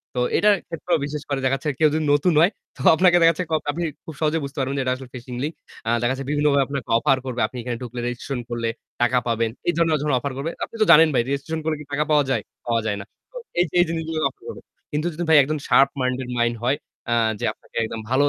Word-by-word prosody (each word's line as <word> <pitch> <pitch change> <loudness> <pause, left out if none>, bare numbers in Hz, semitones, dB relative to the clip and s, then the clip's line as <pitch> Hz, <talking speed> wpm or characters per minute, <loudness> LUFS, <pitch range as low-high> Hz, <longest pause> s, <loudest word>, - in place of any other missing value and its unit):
তো - - 0 0.2
এটার 210 0 +5
ক্ষেত্রেও 170 +1 -1
বিশেষ 150 +1 -5
করে 140 -1 0
দেখা 130 +1 +2
যাচ্ছে 135 +3 -3
কেউ 155 -1 +5
যদি 155 0 0
নতুন 155 +5 +3
হয় 170 +5 +5 0.3
তো - - -9
আপনাকে 180 +1 +5
দেখা 165 - +7
যাচ্ছে 180 +3 -4 0.3
আপনি 170 +4 -3 0.2
খুব 160 - -7
সহজে 155 +1 +2
বুঝতে 140 +3 -7
পারবেন 135 +1 -1
যে - - +1
এটা 130 0 +1
আসলে 130 -1 -11
ফিশিং 125 0 -7
লিংক। 155 +3 -2 0.3
আ - - +2
দেখা 120 +1 +1
যাচ্ছে 135 +1 -5
বিভিন্নভাবে 145 -1 +3
আপনাকে 140 -2 -5
অফার 135 - +3
করবে। 125 -2 -3
আপনি 125 - -10
এখানে 120 0 -4
ঢুকলে, 120 0 -6
রেজিস্ট্রেশন 125 +1 -4
করলে 115 -1 -2 0.3
টাকা 120 +1 +3
পাবেন 115 -1 +1 0.2
এই 175 - +3
ধরনের 165 -2 +3
যখন 150 -2 0
অফার 140 +2 -3
করবে, 150 +5 -3
আপনি - - -7
তো 215 - +6
জানেন 160 +1 +8
ভাই 125 - +3
রেজিস্ট্রেশন 140 +4 -2
করলে 155 -2 0
কি 150 - -10
টাকা 145 +1 +2
পাওয়া 150 -1 +5
যায়? 120 -6 0 0.2
পাওয়া 115 -1 +1
যায় 105 -2 -1
না। - - -9 0.3
তো - - -10 0.2
এই 175 - +5
যে - - -37
এই 175 - +6
জিনিসগুলো 160 -1 -2
অফার 410 - -24
করবে। 465 - -7 0.3
কিন্তু 150 +3 -1
যদি 175 - -3
ভাই 160 - +7
একদম 155 +3 -2
শার্প 135 -1 +5
মাইন্ডেড 130 0 -1
মাইন্ড 120 0 +1
হয়, 135 +4 +2 0.3
আ - - +3 0.3
যে - - -2
আপনাকে - - -27
একদম 110 0 -4
ভালো 130 +3 +3
140 Hz, 255 wpm, -23 LUFS, 125-160 Hz, 0.3 s, জানেন